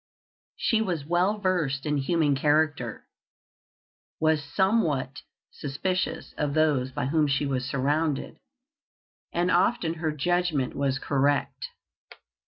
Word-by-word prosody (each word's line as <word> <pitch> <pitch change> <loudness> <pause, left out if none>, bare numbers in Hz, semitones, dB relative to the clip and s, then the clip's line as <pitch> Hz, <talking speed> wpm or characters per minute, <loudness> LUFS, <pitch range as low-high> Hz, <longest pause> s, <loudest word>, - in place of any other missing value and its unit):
She 225 -1 +1
was 175 -9 -2
well 180 +6 +1
versed 165 -9 0
in 150 -1 0
human 150 +1 +1
character, 145 +2 0 1.1
was 155 -1 +2
somewhat 145 - 0 0.3
suspicious 180 +6 -3
of 145 -1 -1
those 145 -5 +2
by 130 - -2
whom 150 +2 +2
she 140 +1 +1
was 130 -2 -1
surrounded, 145 +2 -1 0.9
and 175 +1 +1
often 175 -2 +2
her 160 -2 0
judgment 160 -2 0
was 135 -1 0
correct. 140 +1 0
150 Hz, 110 wpm, -26 LUFS, 140-175 Hz, 1.1 s, was